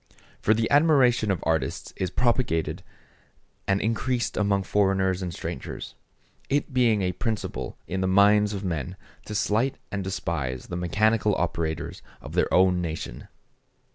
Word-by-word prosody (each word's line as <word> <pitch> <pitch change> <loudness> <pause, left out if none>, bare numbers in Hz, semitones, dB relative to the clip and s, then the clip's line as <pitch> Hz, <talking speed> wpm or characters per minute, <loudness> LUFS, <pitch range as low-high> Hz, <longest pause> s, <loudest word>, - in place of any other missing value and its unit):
For 110 - +3
the 115 +1 +1
admiration 140 -7 +4
of 95 -4 -1
artists 80 -5 -1
is 95 - -2
propagated 120 -7 0 0.9
and 95 0 +2
increased 120 +3 -1
among 100 -2 +1
foreigners 95 -2 +1
and 90 -2 -3
strangers; - - -6 0.6
it 140 0 0
being 115 -5 +3
a 90 - +1
principle 110 +3 -4
in 95 +1 -3
the 95 - +1
minds 105 +2 +4
of 100 - -5
men 90 0 -3 0.3
to 105 - -5
slight 115 +7 +1
and 100 -1 -2
despise 75 -9 -3
the 85 - -4
mechanical 105 +4 +2
operators 80 -2 -2 0.2
of - - -10
their - - +1
own 90 -1 +4
nation. 80 -8 -5
100 Hz, 140 wpm, -26 LUFS, 90-110 Hz, 0.9 s, admiration